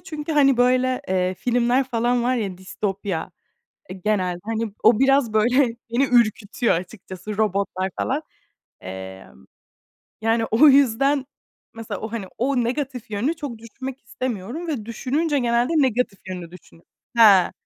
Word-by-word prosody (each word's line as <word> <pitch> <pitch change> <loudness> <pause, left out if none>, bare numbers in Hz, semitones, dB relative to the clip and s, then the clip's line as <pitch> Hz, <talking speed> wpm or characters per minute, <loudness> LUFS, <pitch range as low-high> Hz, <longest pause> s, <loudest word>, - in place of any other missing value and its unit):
çünkü, 315 -3 -5
hani, 275 -3 +4
böyle, 255 +1 +2
eee, 185 0 0
filmler 245 +4 +1
falan 240 0 0
var 250 +2 +1
ya 195 -6 -3
distopya, 190 -2 -4 0.6
eee, 185 0 -8
genelde, 185 -4 0
hani, 225 -1 -3
o 220 -1 +5
biraz 270 -3 +3
böyle 220 +4 +2 0.4
beni 250 +4 +3
ürkütüyor 235 -1 +2
açıkçası 190 +2 -7
robotlar 195 -2 -1
falan. 280 +4 -1 0.6
Emm, 95 -6 -10 0.7
yani 225 +1 +1
o 230 +7 +5
yüzden 275 +1 +3 0.5
mesela 225 -1 -6
o, 220 0 -6
hani, 225 -5 -4
o 255 0 +1
negatif 250 -2 -3
yönünü 225 +10 -1
çok 285 -7 -6
düşünmek 260 +4 -8
istemiyorum 250 - -5
ve 255 -9 -3
düşününce 285 +6 -1
genelde 240 +2 +1
negatif 250 -7 +1
yönünü 180 -3 -6
düşünüyorum. 170 -1 -17 0.3
Ha! 205 -6 +6
230 Hz, 135 wpm, -22 LUFS, 200-260 Hz, 0.7 s, Ha